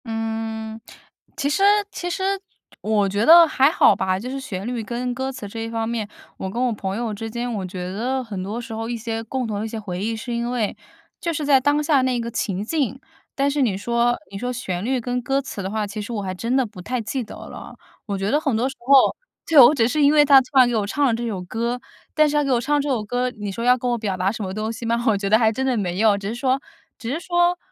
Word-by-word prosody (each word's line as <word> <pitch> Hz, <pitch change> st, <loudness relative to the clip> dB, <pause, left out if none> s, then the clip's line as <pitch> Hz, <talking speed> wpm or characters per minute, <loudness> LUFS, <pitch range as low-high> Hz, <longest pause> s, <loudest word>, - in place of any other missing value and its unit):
嗯， 225 Hz, 0 st, -4 dB, 0.6 s
其 280 Hz, -, 0 dB
实 300 Hz, +7 st, +1 dB, 0.3 s
其 355 Hz, -, -4 dB
实 380 Hz, +2 st, -3 dB, 0.6 s
我 210 Hz, -2 st, +1 dB
觉 200 Hz, +2 st, 0 dB
得 335 Hz, +1 st, +9 dB
还 275 Hz, -2 st, +4 dB
好 320 Hz, -, +5 dB
吧， 185 Hz, 0 st, 0 dB
就 245 Hz, +5 st, -6 dB
是 270 Hz, +1 st, -4 dB
旋 195 Hz, -7 st, -6 dB
律 240 Hz, -1 st, -3 dB
跟 245 Hz, +2 st, -3 dB
歌 265 Hz, +2 st, -3 dB
词 235 Hz, -6 st, -7 dB
这 225 Hz, +3 st, -7 dB
一 225 Hz, 0 st, -4 dB
方 225 Hz, -1 st, -2 dB
面， 225 Hz, -3 st, -2 dB, 0.3 s
我 190 Hz, -, -4 dB
跟 235 Hz, +6 st, -3 dB
我 245 Hz, -, +1 dB
朋 195 Hz, -1 st, -4 dB
友 230 Hz, -2 st, -2 dB
之 225 Hz, +2 st, -5 dB
间， 240 Hz, +2 st, -3 dB
我 200 Hz, -5 st, -3 dB
觉 180 Hz, 0 st, -5 dB
得 255 Hz, +5 st, -1 dB
很 205 Hz, -6 st, -6 dB
多 205 Hz, +5 st, -4 dB
时 230 Hz, -1 st, -7 dB
候 225 Hz, +1 st, -4 dB
一 240 Hz, -, -2 dB
些 225 Hz, 0 st, -4 dB
共 255 Hz, +3 st, -3 dB
同 210 Hz, -3 st, -3 dB
的 215 Hz, -, -3 dB
一 -, -, -3 dB
些 225 Hz, -, -5 dB
回 190 Hz, -3 st, -5 dB
忆， 225 Hz, +1 st, -1 dB
是 235 Hz, +2 st, -5 dB
因 235 Hz, 0 st, -2 dB
为 240 Hz, -4 st, -1 dB, 0.4 s
就 340 Hz, -, -2 dB
是 305 Hz, -2 st, -3 dB
在 280 Hz, -2 st, +5 dB
当 290 Hz, +3 st, +2 dB
下 290 Hz, -3 st, +3 dB
那 255 Hz, -1 st, +1 dB
一 -, -, -2 dB
个 235 Hz, 0 st, -4 dB
情 195 Hz, -3 st, -2 dB
境， 265 Hz, 0 st, -1 dB, 0.4 s
但 280 Hz, 0 st, +2 dB
是 285 Hz, 0 st, 0 dB
你 215 Hz, -7 st, +1 dB
说 235 Hz, +3 st, +1 dB
你 195 Hz, -, -6 dB
说 245 Hz, +2 st, -2 dB
旋 190 Hz, -8 st, -4 dB
律 255 Hz, +3 st, 0 dB
跟 245 Hz, +1 st, -2 dB
歌 270 Hz, +3 st, 0 dB
词 265 Hz, -7 st, -6 dB
的 190 Hz, -, -3 dB
话， 215 Hz, +1 st, -1 dB
其 205 Hz, +1 st, -6 dB
实 210 Hz, -, -7 dB
我 220 Hz, -3 st, -2 dB
还 185 Hz, -1 st, -3 dB
真 230 Hz, +7 st, -2 dB
的 265 Hz, -1 st, +3 dB
不 205 Hz, -4 st, -11 dB
太 250 Hz, +7 st, -3 dB
记 240 Hz, +4 st, -3 dB
得 220 Hz, -, -10 dB
了。 -, -, -10 dB, 0.3 s
我 200 Hz, -2 st, -2 dB
觉 195 Hz, +2 st, -1 dB
得 300 Hz, -, +2 dB
很 275 Hz, -8 st, 0 dB
多 245 Hz, +3 st, +1 dB
时 270 Hz, -, -6 dB
候， 265 Hz, +2 st, +5 dB, 0.3 s
就 300 Hz, -5 st, +8 dB
我 250 Hz, +6 st, +7 dB
只 225 Hz, -5 st, +3 dB
是 300 Hz, +5 st, 0 dB
因 285 Hz, 0 st, +6 dB
为 300 Hz, -1 st, +6 dB
他 275 Hz, -2 st, +8 dB
突 255 Hz, -, -10 dB
然 255 Hz, -1 st, +8 dB
给 240 Hz, -, -1 dB
我 210 Hz, -2 st, 0 dB
唱 285 Hz, +7 st, +1 dB
了 250 Hz, -, +3 dB
这 235 Hz, +1 st, -2 dB
首 205 Hz, -5 st, -3 dB
歌， 235 Hz, +6 st, -2 dB, 0.4 s
但 305 Hz, -1 st, +5 dB
是 295 Hz, -, -1 dB
他 295 Hz, -, +3 dB
给 275 Hz, -, -1 dB
我 245 Hz, -, +3 dB
唱 290 Hz, +4 st, +1 dB
这 290 Hz, -, -3 dB
首 240 Hz, -6 st, 0 dB
歌， 245 Hz, +4 st, -1 dB
你 210 Hz, -4 st, -6 dB
说 230 Hz, +4 st, -5 dB
要 250 Hz, +1 st, +5 dB
跟 250 Hz, 0 st, -1 dB
我 -, -, +2 dB
表 200 Hz, -4 st, -2 dB
达 185 Hz, +2 st, +1 dB
什 220 Hz, -, -6 dB
么 190 Hz, -2 st, -3 dB
东 215 Hz, +3 st, -3 dB
西 230 Hz, -, -9 dB
吗？ 235 Hz, +1 st, 0 dB
我 215 Hz, -, +3 dB
觉 200 Hz, 0 st, -2 dB
得 215 Hz, -, +6 dB
还 220 Hz, -1 st, +3 dB
真 260 Hz, +4 st, -3 dB
的 260 Hz, -2 st, +1 dB
没 185 Hz, -3 st, -2 dB
有， 215 Hz, -2 st, +4 dB
只 200 Hz, 0 st, -6 dB
是 -, -, -3 dB
说 260 Hz, +2 st, +1 dB, 0.4 s
只 230 Hz, -, -5 dB
是 320 Hz, -, -2 dB
说 350 Hz, 0 st, +2 dB
235 Hz, 305 characters per minute, -22 LUFS, 215-260 Hz, 0.6 s, 得